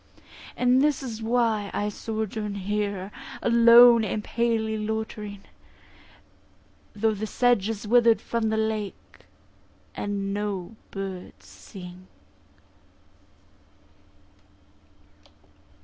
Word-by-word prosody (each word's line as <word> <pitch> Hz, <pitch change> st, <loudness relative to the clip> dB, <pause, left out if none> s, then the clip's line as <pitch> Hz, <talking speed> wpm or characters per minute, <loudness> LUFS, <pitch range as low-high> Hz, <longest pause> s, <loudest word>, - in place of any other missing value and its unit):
And 250 Hz, +1 st, +3 dB
this 290 Hz, -1 st, +1 dB
is 230 Hz, -4 st, -6 dB
why 225 Hz, -3 st, +1 dB
I 205 Hz, -, -1 dB
sojourn 215 Hz, -1 st, -4 dB
here, 200 Hz, -1 st, -3 dB, 0.3 s
Alone 235 Hz, 0 st, +7 dB
and 210 Hz, 0 st, -2 dB
palely 225 Hz, -1 st, 0 dB
loitering; 215 Hz, -2 st, -4 dB, 1.5 s
Though 220 Hz, +1 st, +1 dB
the 215 Hz, +1 st, -4 dB
sedge 240 Hz, -3 st, +2 dB
is 215 Hz, -1 st, -5 dB
wither'd 230 Hz, -1 st, +5 dB
from 225 Hz, 0 st, -2 dB
the 220 Hz, -, 0 dB
lake, 220 Hz, -2 st, -4 dB, 0.7 s
And 200 Hz, -1 st, -3 dB
no 205 Hz, -1 st, -4 dB
birds 195 Hz, -2 st, -7 dB
sing. 185 Hz, -1 st, -12 dB
220 Hz, 85 wpm, -25 LUFS, 205-230 Hz, 1.5 s, Alone